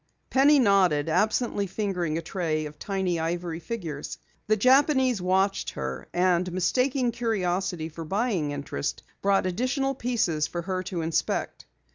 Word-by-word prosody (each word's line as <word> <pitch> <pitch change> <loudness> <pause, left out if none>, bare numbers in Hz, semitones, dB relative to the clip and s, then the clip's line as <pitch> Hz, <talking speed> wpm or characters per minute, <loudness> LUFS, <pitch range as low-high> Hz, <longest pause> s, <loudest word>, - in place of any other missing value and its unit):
Penny 280 +3 +6
nodded, 190 - +3
absently 210 +3 +1
fingering 180 -5 -2
a 165 - -4
tray 160 -3 -2
of 150 0 -9
tiny 190 -4 -1
ivory 170 0 -2
figures. 165 -7 -5 0.3
The 215 0 +3
Japanese 260 - +4
watched 190 +2 +1
her, 65 0 -4
and 180 0 +2
mistaking 250 +8 +1
curiosity 190 -7 -1
for 165 +1 -8
buying 195 -3 0
interest, 140 - -4 0.2
brought 195 -1 +2
additional 255 +8 0
pieces 220 - 0
for 170 -1 -4
her 185 0 -2
to 175 -3 -3
inspect. 160 0 -2
185 Hz, 135 wpm, -26 LUFS, 165-230 Hz, 0.3 s, Penny